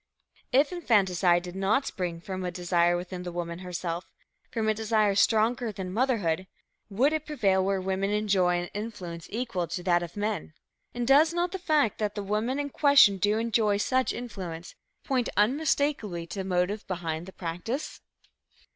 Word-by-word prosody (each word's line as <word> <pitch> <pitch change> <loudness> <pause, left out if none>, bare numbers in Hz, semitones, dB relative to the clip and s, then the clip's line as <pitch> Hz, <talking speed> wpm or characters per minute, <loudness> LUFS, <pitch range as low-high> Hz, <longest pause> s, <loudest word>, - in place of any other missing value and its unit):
If 280 +5 +4
infanticide 190 - +2
did 180 0 -8
not 200 +8 +1
spring 175 -3 -4
from 185 +1 -5
a 180 - -1
desire 175 -1 +1
within 180 +1 -6
the 180 -1 -5
woman 170 0 -4
herself, 175 -1 -4 0.4
from 225 -2 -2
a 215 - +3
desire 215 -1 +1
stronger 225 +3 +2
than 185 -2 -6
motherhood, 205 -8 0 0.4
would 255 +9 +2
it 310 -1 -2
prevail 195 -11 +2
where 195 0 0
women 190 +1 -1
enjoy 195 -4 +2
an 175 - -5
influence 195 -6 -6
equal 205 -7 -2
to 175 +2 -5
that 175 -1 +3
of 175 +2 -7
men? 205 -6 -2 0.4
And 240 -1 -2
does 305 +5 +5
not 345 0 0
the 380 - -4
fact 305 - +1
that 210 -1 -1
the 205 - -3
women 215 +6 -1
in 285 -1 -3
question 280 -10 +6
do 205 +3 +2
enjoy 220 -2 +1
such 255 +5 +1
influence, 185 -8 -7 0.3
point 255 -4 0
unmistakably 260 - +1
to 185 +4 -7
the 190 - -3
motive 180 +4 0
behind 170 -2 -4
the 190 - -10
practice? 180 - -5
200 Hz, 170 wpm, -28 LUFS, 180-235 Hz, 0.4 s, question